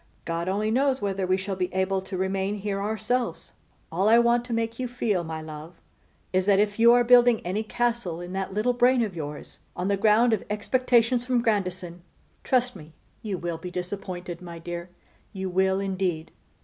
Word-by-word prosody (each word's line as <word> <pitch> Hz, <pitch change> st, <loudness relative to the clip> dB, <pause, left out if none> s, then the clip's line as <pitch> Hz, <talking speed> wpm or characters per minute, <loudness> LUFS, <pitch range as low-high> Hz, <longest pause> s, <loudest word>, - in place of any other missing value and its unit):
God 170 Hz, +2 st, -2 dB
only 210 Hz, +3 st, 0 dB
knows 265 Hz, +2 st, +2 dB
whether 195 Hz, -2 st, -2 dB
we 185 Hz, +1 st, +2 dB
shall 190 Hz, 0 st, -4 dB
be 185 Hz, -1 st, -2 dB
able 190 Hz, 0 st, +1 dB
to 190 Hz, 0 st, -6 dB
remain 190 Hz, +2 st, -1 dB
here 200 Hz, -1 st, -3 dB
ourselves. 220 Hz, +4 st, -2 dB, 0.4 s
All 190 Hz, +6 st, +2 dB
I 230 Hz, -, +7 dB
want 235 Hz, 0 st, +3 dB
to 245 Hz, -, -9 dB
make 230 Hz, 0 st, -2 dB
you 255 Hz, -, -1 dB
feel, 225 Hz, -7 st, -1 dB
my 160 Hz, -1 st, -6 dB
love, 155 Hz, +2 st, -10 dB, 0.5 s
is, 185 Hz, +1 st, +1 dB
that 200 Hz, -1 st, +5 dB
if 205 Hz, +1 st, +1 dB
you 235 Hz, +1 st, +7 dB
are 245 Hz, 0 st, +5 dB
building 245 Hz, -1 st, +6 dB
any 190 Hz, +5 st, -1 dB
castle 235 Hz, -6 st, -1 dB
in 175 Hz, +1 st, -7 dB
that 190 Hz, 0 st, -3 dB
little 215 Hz, +5 st, +1 dB
brain 245 Hz, 0 st, +4 dB
of 205 Hz, -5 st, -4 dB
yours 150 Hz, -2 st, -7 dB, 0.2 s
on 180 Hz, +2 st, -2 dB
the 200 Hz, -, +2 dB
ground 220 Hz, +3 st, +4 dB
of 215 Hz, -, 0 dB
expectations 240 Hz, +2 st, +2 dB
from 250 Hz, -1 st, 0 dB
Grandison, 185 Hz, -5 st, -1 dB, 0.4 s
trust 250 Hz, -2 st, +1 dB
me 155 Hz, -3 st, -12 dB, 0.3 s
you 205 Hz, -4 st, -3 dB
will 170 Hz, -2 st, -4 dB
be 180 Hz, -, -6 dB
disappointed, 180 Hz, -1 st, -5 dB
my 170 Hz, -2 st, -8 dB
dear, 170 Hz, +1 st, -6 dB, 0.4 s
you 190 Hz, -2 st, -4 dB
will, 190 Hz, +1 st, +2 dB
indeed. 185 Hz, -4 st, -2 dB
195 Hz, 190 wpm, -26 LUFS, 180-230 Hz, 0.5 s, I